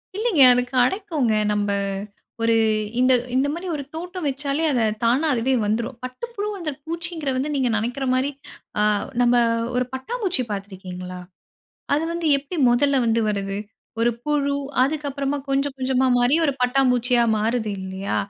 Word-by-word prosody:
இல்லைங்க. 420 Hz, -, +2 dB
அது 250 Hz, -, +2 dB
கெடைக்கும்ங்க. 270 Hz, -, +1 dB, 0.2 s
நம்ம 205 Hz, 0 st, 0 dB, 0.7 s
ஒரு 230 Hz, 0 st, +3 dB, 0.4 s
இந்த 255 Hz, 0 st, +5 dB, 0.2 s
இந்த 270 Hz, +2 st, +2 dB
மாதிரி 355 Hz, +2 st, -5 dB
ஒரு 285 Hz, -, -4 dB
தோட்டம் 355 Hz, 0 st, -5 dB
வச்சாலே 280 Hz, +3 st, -2 dB
அத 245 Hz, -3 st, +1 dB, 0.2 s
தானா 260 Hz, +7 st, +3 dB
அதுவே 250 Hz, +2 st, +1 dB
வந்துரும். 230 Hz, +4 st, -2 dB
பட்டு 255 Hz, -, -5 dB
புழு 410 Hz, +1 st, -2 dB, 0.4 s
பூச்சிகிறத 335 Hz, -4 st, -3 dB
வந்து 290 Hz, +3 st, -1 dB
நீங்க 260 Hz, -3 st, +1 dB
நெனைக்கிற 245 Hz, +5 st, -2 dB
மாதிரி, 260 Hz, +2 st, +1 dB, 0.5 s
ஆ -, -, +3 dB, 0.4 s
நம்ம 240 Hz, 0 st, +4 dB, 0.4 s
ஒரு 250 Hz, 0 st, +1 dB
பட்டாம்பூச்சி 370 Hz, -, -1 dB
பார்த்திருக்கீங்களா? 185 Hz, -2 st, -7 dB, 0.8 s
அது 300 Hz, -, +1 dB
வந்து 340 Hz, -1 st, -3 dB
எப்டி 290 Hz, +6 st, -7 dB
மொதல்ல 275 Hz, +2 st, +3 dB
வந்து 230 Hz, 0 st, +2 dB
வருது? 195 Hz, -1 st, -2 dB, 0.4 s
ஒரு 240 Hz, +1 st, +3 dB
புழு, 285 Hz, -1 st, +1 dB, 0.3 s
அதுக்கு 295 Hz, +2 st, -1 dB
அப்புறமாகொஞ்சம் 275 Hz, 0 st, -2 dB
கொஞ்சமா 260 Hz, 0 st, +1 dB
மாறி 245 Hz, +5 st, +3 dB
ஒரு 280 Hz, -, +1 dB
பட்டாம்பூச்சியா 250 Hz, -1 st, +3 dB
மாறுது 220 Hz, 0 st, 0 dB
இல்லையா? 190 Hz, +1 st, -4 dB
260 Hz, 140 wpm, -22 LUFS, 235-295 Hz, 0.8 s, இந்த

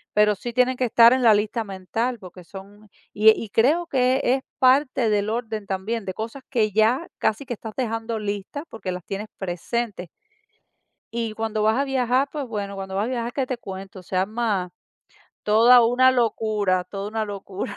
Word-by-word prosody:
pero 210 Hz, 0 st, +4 dB
sí 240 Hz, +5 st, -6 dB
tienen 250 Hz, +1 st, +2 dB
que 255 Hz, -, +1 dB
estar 235 Hz, +1 st, +6 dB
en 260 Hz, -1 st, +1 dB
la 225 Hz, -2 st, +7 dB
lista 215 Hz, +2 st, 0 dB
mental, 220 Hz, +5 st, -3 dB
porque 180 Hz, -1 st, -12 dB
son 200 Hz, +3 st, -13 dB, 0.3 s
y 215 Hz, +1 st, +6 dB
y 220 Hz, -1 st, -4 dB
creo 305 Hz, -, +2 dB
que 260 Hz, -2 st, +2 dB
es 260 Hz, +2 st, +2 dB, 0.2 s
parte 255 Hz, -2 st, +3 dB
del 205 Hz, 0 st, +1 dB
orden 220 Hz, -3 st, -3 dB
también, 200 Hz, +3 st, -3 dB
de 185 Hz, -, -4 dB
cosas 230 Hz, +6 st, -6 dB
que 215 Hz, -5 st, +1 dB
ya 225 Hz, -, +2 dB
casi 220 Hz, +6 st, 0 dB
que 245 Hz, -, -4 dB
estás 220 Hz, 0 st, -8 dB
dejando 225 Hz, -2 st, -2 dB
listas, 205 Hz, +8 st, -4 dB
porque 200 Hz, -5 st, -5 dB
las 180 Hz, -1 st, -6 dB
tienes 205 Hz, +2 st, -5 dB
presentes. 190 Hz, +1 st, -3 dB, 1.1 s
Y 230 Hz, -2 st, -2 dB
cuando 220 Hz, -1 st, -2 dB
vas 220 Hz, +3 st, +3 dB
a 275 Hz, -, +2 dB
viajar, 260 Hz, 0 st, +1 dB
pues, 290 Hz, -3 st, -4 dB
bueno, 200 Hz, -3 st, -4 dB
cuando 190 Hz, 0 st, -6 dB
vas 205 Hz, +2 st, 0 dB
a -, -, -3 dB
viajar, 240 Hz, -1 st, -3 dB
¿qué 270 Hz, -2 st, -1 dB
te 255 Hz, -1 st, -4 dB
cuento? 190 Hz, -2 st, -9 dB
Se 185 Hz, -, -7 dB
arma 195 Hz, -2 st, -1 dB, 0.7 s
toda 230 Hz, +3 st, +6 dB
una 255 Hz, +2 st, +4 dB
locura, 215 Hz, -6 st, 0 dB
toda 200 Hz, 0 st, -6 dB
una 220 Hz, 0 st, -2 dB
locura. 200 Hz, -1 st, -6 dB
220 Hz, 185 wpm, -23 LUFS, 200-245 Hz, 1.1 s, la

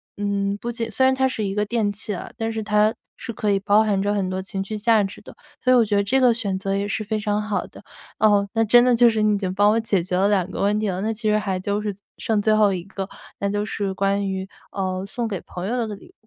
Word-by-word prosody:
嗯， 200 Hz, 0 st, -1 dB
不 235 Hz, +3 st, -4 dB
仅 230 Hz, -1 st, -3 dB
虽 260 Hz, +5 st, +2 dB
然 260 Hz, -, +4 dB
它 265 Hz, 0 st, +2 dB
是 240 Hz, -4 st, -3 dB
一 195 Hz, -1 st, -2 dB
个 210 Hz, +1 st, 0 dB
电 215 Hz, -1 st, 0 dB
器 205 Hz, 0 st, -4 dB
啊， -, -, -7 dB
但 225 Hz, -1 st, -2 dB
是 220 Hz, -1 st, -3 dB
它 210 Hz, +1 st, +3 dB, 0.2 s
是 230 Hz, -, -6 dB
可 210 Hz, -1 st, 0 dB
以 200 Hz, -, +2 dB
包 205 Hz, +2 st, +4 dB
含 205 Hz, -3 st, +1 dB
着 205 Hz, +1 st, 0 dB
很 195 Hz, -3 st, -1 dB
多 185 Hz, 0 st, -2 dB
情 195 Hz, 0 st, -4 dB
绪 215 Hz, +2 st, -5 dB
价 215 Hz, 0 st, +3 dB
值 195 Hz, 0 st, -6 dB
的， -, -, -13 dB, 0.3 s
所 255 Hz, -, +4 dB
以 -, -, +6 dB
我 240 Hz, -, +6 dB
觉 205 Hz, -2 st, 0 dB
得 -, -, +4 dB
这 260 Hz, +7 st, +1 dB
个 250 Hz, -2 st, +5 dB
选 205 Hz, -5 st, -2 dB
择 195 Hz, 0 st, -2 dB
也 200 Hz, +1 st, -1 dB
是 210 Hz, +1 st, -2 dB
非 215 Hz, +1 st, -2 dB
常 210 Hz, 0 st, 0 dB
好 210 Hz, -1 st, -2 dB
的。 -, -, -15 dB, 0.4 s
哦， 205 Hz, -2 st, +4 dB
那 225 Hz, -1 st, +2 dB
真 240 Hz, +3 st, +6 dB
的 250 Hz, -1 st, +4 dB
就 240 Hz, 0 st, +6 dB
是 220 Hz, -1 st, 0 dB
你 215 Hz, 0 st, +3 dB
已 -, -, 0 dB
经 190 Hz, -2 st, -3 dB
帮 205 Hz, +2 st, +4 dB
我 220 Hz, -, +2 dB
解 215 Hz, -5 st, +1 dB
决 180 Hz, +1 st, -3 dB
了 195 Hz, +2 st, +3 dB
2 190 Hz, -3 st, +1 dB
个 -, -, -5 dB
问 205 Hz, +1 st, +2 dB
题 215 Hz, -, -1 dB
了， 185 Hz, -1 st, -2 dB
那 220 Hz, +2 st, 0 dB
其 220 Hz, 0 st, -2 dB
实 210 Hz, -, +3 dB
还 195 Hz, -3 st, -2 dB
就 200 Hz, +2 st, -1 dB
是 210 Hz, -1 st, -3 dB, 0.2 s
剩 220 Hz, -2 st, 0 dB
最 215 Hz, +1 st, +3 dB
后 210 Hz, -2 st, +4 dB
一 180 Hz, -2 st, -4 dB
个， 195 Hz, 0 st, -6 dB, 0.3 s
那 200 Hz, -, 0 dB
就 205 Hz, +1 st, -1 dB
是 200 Hz, -2 st, -2 dB
关 195 Hz, +1 st, 0 dB
于， 190 Hz, 0 st, -3 dB, 0.3 s
嗯， 185 Hz, -1 st, -2 dB
送 235 Hz, +3 st, -3 dB
给 195 Hz, -5 st, -4 dB
朋 180 Hz, +1 st, -6 dB
友 235 Hz, -, -1 dB
的 240 Hz, -2 st, 0 dB
礼 200 Hz, -, -12 dB
物。 -, -, -23 dB
205 Hz, 315 characters per minute, -23 LUFS, 195-220 Hz, 0.4 s, 以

